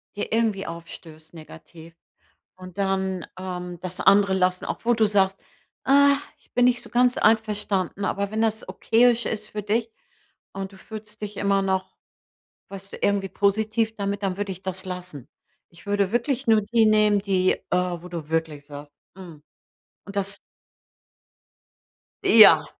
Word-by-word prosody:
dir 205 - -4
irgendwie 220 -3 0
aufstößt 165 -1 -10
negativ. 160 +1 -13 0.6
Und 185 0 -12
dann, 190 -2 -1
ähm, 180 -1 -6
das 185 -1 -6
andere 200 -1 +5
lassen, 185 -1 +1
obwohl 240 +1 0
du 220 -1 +3
sagst: 195 -2 +2 0.5
„Ah, 280 +1 +5 0.2
ich - - -32
bin 245 0 +3
nicht 240 -1 +2
so - - -11
ganz 245 +1 +2
einverstanden.“ 210 -3 0
Aber 200 +1 -2
wenn 220 +1 -1
das 220 -1 -1
okayisch 235 +1 +2
ist 215 -1 -4
für 210 - -5
dich 225 +3 -1 0.6
und 195 0 -6
du - - -14
fühlst 215 +1 -10
dich 210 -1 -6
immer 200 0 +1
noch, 190 -1 -2 0.7
weißt 195 0 -10
du, - - -6
irgendwie 200 -1 +1
positiv 220 +3 0
damit, 200 0 -3
dann 190 -1 -1
würde 205 -1 -3
ich 190 +1 -9
das 190 0 -3
lassen. 180 -7 -7 0.4
Ich 170 - -18
würde 205 -1 0
wirklich 245 +2 -1
nur 220 -1 +5
die 225 +2 +2
nehmen, 210 -1 +4
die, 190 -2 +2
äh, - - -9 0.4
wo 180 - -10
du 165 -4 -7
wirklich 160 -3 -2
sagst: 145 0 -10 0.2
„Hm.“ 170 -6 -12 0.6
Und 200 - -10
das 200 0 0 1.9
Ja. 200 -9 +8
200 Hz, 155 wpm, -24 LUFS, 185-215 Hz, 1.9 s, Ja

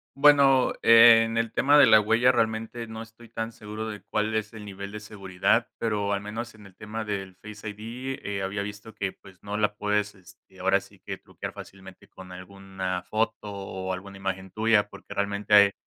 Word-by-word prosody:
Bueno, 140 -2 +5
en 115 0 +7
el 115 -1 -1
tema 145 +3 +4
de - - +9
la 110 - +7
huella 115 +4 +3
realmente 115 +1 -1
no 110 0 -8
estoy 115 +1 -14
tan 115 0 -5
seguro 110 +1 -7
de 105 -2 -7
cuál 110 +1 -1
es 110 0 -2
el 110 -2 -10
nivel 100 0 -7
de 105 - -6
seguridad, 100 +2 0
pero 105 -3 -1
al 100 - 0
menos 115 +3 -6
en 105 -2 -16
el 95 -2 -16
tema 110 +2 -6
del 95 -3 -5
Face 105 0 -8
ID, 120 +6 -6
eh, 100 -1 -4
había 100 +1 -2
visto 105 +2 -8
que, 95 -1 -3
pues, 95 -2 -18
no 105 0 -5
la 105 0 +1
puedes, 105 0 -1
este, 95 0 -19
ahora 95 +1 +2
sí 100 0 -18
que - - -5
truquear - - -8
fácilmente 95 -1 -13
con 90 -1 -12
alguna 95 0 -5
foto 110 +1 -1
o 95 -1 -5
alguna 100 +1 -8
imagen 95 -1 -4
tuya. 110 -1 +2
Porque - - -11
realmente 100 +1 -2
ahí, 100 -1 +8
105 Hz, 195 wpm, -26 LUFS, 100-115 Hz, -, de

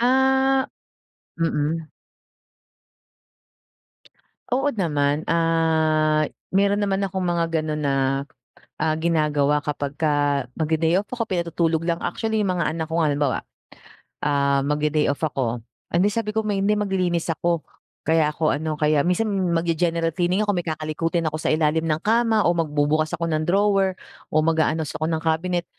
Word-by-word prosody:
Ah 265 +1 +3 0.7
mm. 160 0 -1 2.7
Oo 270 +3 +2
naman. 150 - 0
Ah, 160 -2 +2 0.2
meron 200 +1 +3
naman 200 -1 0
akong 190 -1 -2
mga 170 -1 +1
gano'n 155 -2 -2
na, 140 -1 +1 0.9
ah, 155 0 +1
ginagawa 150 -3 +1
kapagka 145 -1 0
magde-day 160 +2 +1
off 205 - -19
ako, 240 -2 -2
pinatutulog 170 -2 0
lang. 170 -1 0
Actually, 220 -1 -1
yung 185 - +1
mga 170 - +1
anak 160 +1 -3
ko 165 +1 0
nga 155 - +2
halimbawa, 145 -2 0 0.9
ah, 140 -1 +2
magde-day 150 +1 +1
off 140 -1 -1
ako, 125 -5 -1 0.3
"Hindi," 190 +5 +2
sabi 215 -1 -2
ko 220 - +1
"may 205 -2 -1
hindi 210 +2 +2
maglilinis 180 -5 0
ako 170 0 -1 0.4
kaya 160 -1 +3
ako 155 0 +1
ano." 155 0 -3
Kaya 150 -1 +2
minsan 215 +5 +1 0.2
mag-ge-general 165 0 0
cleaning 180 +4 +1
ako. 205 - +1
May 175 - -3
kakalikutin 160 +1 -1
ako - - -2
sa - - -1
ilalim 155 +1 +1
ng 155 0 0
kama, 225 -1 +3
o 175 - +4
magbubukas 155 0 +1
ako 170 - -3
ng 155 0 0
drawer, 195 0 +2 0.4
o 155 - +3
mag-aayos 160 -1 +1
ako 155 - 0
ng 160 -1 -1
cabinet. 175 +2 0
165 Hz, 145 wpm, -23 LUFS, 155-185 Hz, 2.7 s, o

